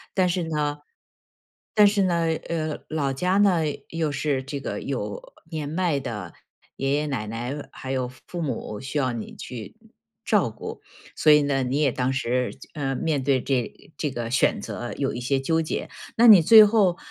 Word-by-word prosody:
但 185 -2 +3
是 175 0 0
呢 150 -2 -1 1.0
但 210 -1 +7
是 200 0 +2
呢， 170 -2 +1 0.2
呃， 155 -2 -2
老 145 -3 -1
家 180 +7 +1
呢， 190 -5 +4 0.3
又 160 -2 -1
是 140 -1 -1
这 140 +1 -5
个 - - -4
有 - - -5 0.2
年 150 -2 -3
迈 165 -3 0
的 115 -6 -6 0.4
爷 135 +1 0
爷 150 +1 0
奶 115 -7 -3
奶， 120 +6 -5
还 130 - -7
有 130 -2 -1
父 130 - -14
父 175 -1 -5
母 115 -7 -4
需 135 +3 -4
要 130 -2 +1
你 115 - -6
去 120 - -8 0.5
照 - - +2
顾， - - -8 0.3
所 155 - +5
以 150 0 +7
呢， 135 -1 +1
你 130 +4 -1
也 140 -4 +3
当 130 +1 -1
时 125 -1 -1
就 - - -14
呃， 135 -2 -2
面 145 -2 -1
对 135 -1 +2
这 130 -3 +1
呃 150 - -13
这 150 - -1
个 120 -2 -4
选 135 - +2
择 120 - -5
有 140 -1 -1
一 120 - -5
些 135 +2 +1
纠 160 +4 +1
结。 155 - -3 0.3
那 235 - +6
你 200 -6 +10
最 215 +5 +9
后， 200 -5 +3
145 Hz, 205 characters per minute, -24 LUFS, 130-165 Hz, 1.0 s, 你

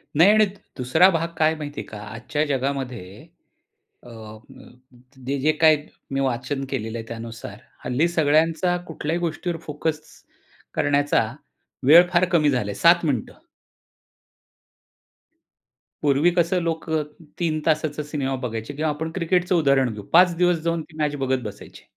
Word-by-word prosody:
नाही 175 +7 +7
आणि 215 0 +5 0.3
दुसरा 130 +9 +4
भाग 165 -2 0
काय 155 - +4
आहे 160 - -2
माहिती 145 -1 -6
आहे - - -10
का? 110 - -9
आजच्या 120 +7 -3
जगामध्ये 130 -8 -4 0.8
अ, 120 - -13
म 110 -1 -13 0.6
जे 140 +2 -1
जे 150 +4 +3
काही 155 -1 +6 0.4
मी 135 - 0
वाचन 130 +2 -2
केलेलं 115 -4 -4
आहे 115 - -7
त्यानुसार 115 -3 -8 0.3
हल्ली 125 +7 +1
सगळ्यांचा 165 +2 +2
कुठल्याही 160 +1 -3
गोष्टीवर 170 0 -3
फोकस 150 +1 -2 0.7
करण्याचा 145 -4 +2 0.6
वेळ 170 +4 +8
फार 175 +1 +4
कमी 155 -4 +3
झाला 125 -6 -1
आहे - - -7
7 170 0 +5
मिनिटं. 130 -8 -2 2.7
पूर्वी 145 +4 +3
कसं 170 +2 +2
लोक 165 -1 -3 0.5
3 160 -3 0
तासाचा 155 -1 0
सिनेमा 140 -3 -3
बघायचे 115 +2 -5
किंवा 155 +2 -1
आपण 160 +2 -4
क्रिकेटचं 180 0 +1
उदाहरण 140 -7 +2
घेऊ 105 - -8
5 175 0 +6
दिवस 180 -1 +3
जाऊन 170 -1 0
ती 155 - -15
मॅच 150 -1 -1
बघत 130 -2 -1
बसायचे. 105 -1 -10
150 Hz, 145 wpm, -23 LUFS, 130-165 Hz, 2.7 s, वेळ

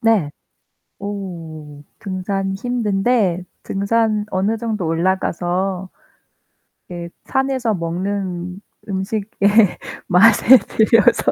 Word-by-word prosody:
네. 225 - +2 0.7
오. 165 -7 -7 0.2
등산 195 0 -3
힘든데 210 -4 0 0.2
등산 215 +1 0
어느 200 +4 0
정도 215 -5 -3
올라가서 180 +2 -1 1.0
이게 175 -1 -7 0.2
산에서 265 -4 0
먹는 180 +1 -3 0.3
음식의 200 +2 -3 0.8
맛에 215 +6 +7
들려서. 230 +1 +3
195 Hz, 170 characters per minute, -19 LUFS, 180-220 Hz, 1.0 s, 맛에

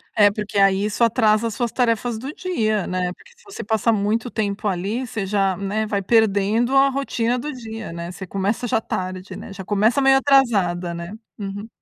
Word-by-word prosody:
É, 205 -1 +6
porque, 205 0 -3
aí, 195 0 +4
isso 210 +3 0
atrasa 220 -1 +3
as 220 - -5
suas 240 -2 -1
tarefas 235 -2 0
do 265 +5 -5
dia, 220 - -1
né? 180 -1 -2
Porque 485 - -20
se 480 - -24
você 405 - -8
passa 220 +2 +1
muito 220 +3 0
tempo, 210 -2 -2
ali, 205 +7 -2
você 215 -4 -3
já, 195 -2 +1
né, 205 +2 -2
vai 200 -2 -1
perdendo 220 +3 +2
a 270 0 +6
rotina 250 -3 -1
do 300 +5 -4
dia, 225 - -7
né? 170 +1 -6
Você 185 +1 -8
começa 200 +6 -1
já 225 - +2
tarde, 185 -2 -5
né? - - -9
Já 195 -1 -7
começa 215 +6 +2
meio 270 0 +6
atrasada, 205 -11 +2
né? 170 +3 -7 0.3
Uhum. 205 +1 -5
215 Hz, 200 wpm, -22 LUFS, 195-235 Hz, 0.3 s, É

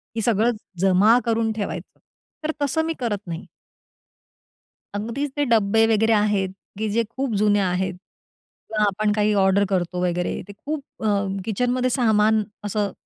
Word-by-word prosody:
की 225 - -1
सगळं 225 +1 +2 0.3
जमा 195 +5 +5
करून 225 -1 +1
ठेवायचं, 210 -2 -5 0.4
तर 310 - 0
तसं 285 +3 +1
मी 330 - -1
करत 210 -5 -3
नाही. 170 +1 -5 1.5
अगदीच 240 +7 -3
ते 290 - +2
डब्बे 225 0 +4
वगैरे 225 +1 +3
आहेत, 205 -3 +1 0.2
की 215 +1 -1
जे 230 +3 +1
खूप 255 +4 -4
जुने 205 -1 +4
आहेत 185 -1 0
किंवा 210 +2 -6
आपण 210 +1 +1
काही 210 0 +2
ऑर्डर 195 +1 +3
करतो 180 -2 -1
वगैरे, 175 0 -2
ते 205 - -9
खूप 285 +7 -5 0.2
अ, 200 -2 +1 0.2
किचनमध्ये 250 +4 0
सामान 220 -1 +3 0.2
असं 205 -1 -1
210 Hz, 145 wpm, -23 LUFS, 200-230 Hz, 1.5 s, जमा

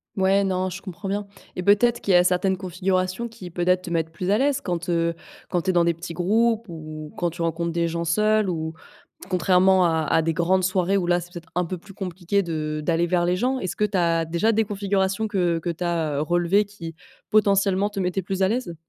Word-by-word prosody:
Ouais, 195 +1 +3
non, 185 -1 0
je 180 +2 -6
comprends 195 +1 -7
bien 205 +1 -2 0.3
et 180 - -3
peut-être 235 +4 +4
qu'il 195 - 0
y - - +8
a 175 - +5
certaines 185 +1 +2
configurations 185 +3 -1
qui, 220 -6 -10
peut-être, 180 +2 +1
te 180 - -8
mettent 165 -1 -1
plus 180 +3 -4
à 205 - +4
l'aise 280 +1 +1
quand, 175 -4 -3
heu, 170 -1 +1 0.3
quand 175 -2 0
tu 185 - +1
es - - -5
dans 170 -1 +3
des 170 -1 +1
petits 170 0 -7
groupes 225 +5 +1
ou 155 -2 -8
quand 175 -1 0
tu 170 +1 -8
rencontres 165 +1 -1
des 170 0 0
gens 170 0 -3
seuls, 215 +4 +2
ou, 160 -2 -3 0.6
contrairement 185 0 +4
à 160 -1 +1
à 160 - +2
des 165 0 0
grandes 185 +3 +2
soirées, 185 +1 +1
où 175 -2 -1
là, 175 0 +3
c'est 175 +1 -10
peut-être 170 -2 -10
un 180 -1 +1
peu 180 0 -5
plus 195 +2 -15
compliqué 190 +1 -1
de 155 -2 -3
d'aller 170 0 +1
vers 175 0 +1
les 180 +1 +2
gens. 260 +4 0
Est-ce 185 - -4
que 210 - +1
tu 200 -2 -2
as 165 -1 +2
déjà 170 +8 +1
des 220 0 +2
configurations 200 +1 -1
que 175 -5 +1
que 170 - -4
tu 170 +2 -6
as, 165 -4 -1
heu, - - 0
relevées, 175 +5 +2
qui, 170 -5 -9 0.4
potentiellement, 200 -1 +3
te 205 -1 -6
mettaient 180 +1 -1
plus 190 +1 -2
à - - +4
l'aise? 225 -8 -2
180 Hz, 240 wpm, -24 LUFS, 170-195 Hz, 0.6 s, y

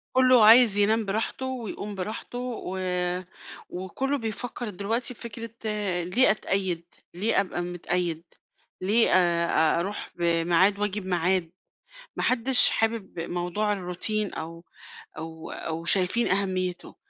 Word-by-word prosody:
كلُّه 255 -3 +6
عايز 225 -2 +8
ينام 215 +2 +3
براحته 220 +6 -2
ويقوم 225 -5 -5
براحته، 215 +5 -5 0.3
و 190 +1 -4 0.9
وكلُّه 225 +11 -2
بيفكّر 235 0 -4
دلوقتي 220 +6 -2
في - - -17
فكرة 230 0 -6 0.5
ليه 215 +8 +4
أتقيد؟ 190 -4 -1 0.3
ليه 195 +4 +2
أبقى 185 -2 -4
متقيد، 175 -1 -2 0.6
ليه 215 +5 +3
آآ، 170 -3 +3
أروح 195 +4 -4
بميعاد 170 +3 +2
وآجي 210 0 -1
بميعاد، 180 -2 0 0.6
ما - - -2
حدش 255 +1 +3
حابب 225 -5 -1
موضوع 180 +5 -1
الروتين 200 +3 -2
أو 165 +1 -7 0.5
أو 160 0 -7
أو 165 +1 -5
شايفين 190 +6 +2
أهميتُه، 185 -2 -1
195 Hz, 115 wpm, -26 LUFS, 175-225 Hz, 0.9 s, عايز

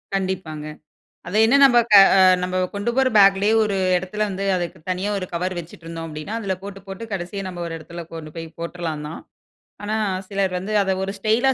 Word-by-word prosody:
கண்டிப்பாங்க. 185 -6 -3 0.6
அத 180 - -7
என்ன 240 +5 +4
நம்ப 240 -3 +6
க - - +6 0.2
அ - - +6 0.2
நம்ப 185 0 -2 0.2
கொண்டு 205 +4 -1
போற 265 -1 +4
பேக்லயே 200 +1 +5
ஒரு 205 -2 -1 0.2
இடத்தில 185 +4 -2
வந்து 195 0 -4
அதுக்கு 175 -2 -4
தனியா 185 +3 -1
ஒரு 185 - -4
கவர் 180 +2 -2
வச்சுட்ருந்தோம் 165 0 -8
அப்படின்னா 155 +7 -6
அதில 195 -3 -1
போட்டு 195 0 -8
போட்டு 195 +4 -7
கடைசியா 190 +1 -4
நம்ம 175 -2 -6
ஒரு 165 - -5
இடத்துல 170 +2 -9
கொண்டு 155 -2 -8
போய் 165 0 -6
போட்டறலாம் 165 -3 -4
தான். 160 - -8 0.6
ஆனா, 210 +1 -2 0.3
சிலர் 195 -1 -1
வந்து 195 +4 -4
அத 195 -1 0
ஒரு 195 - -2
ஸ்டைலா 225 +6 +2
190 Hz, 185 wpm, -22 LUFS, 170-200 Hz, 0.6 s, நம்ப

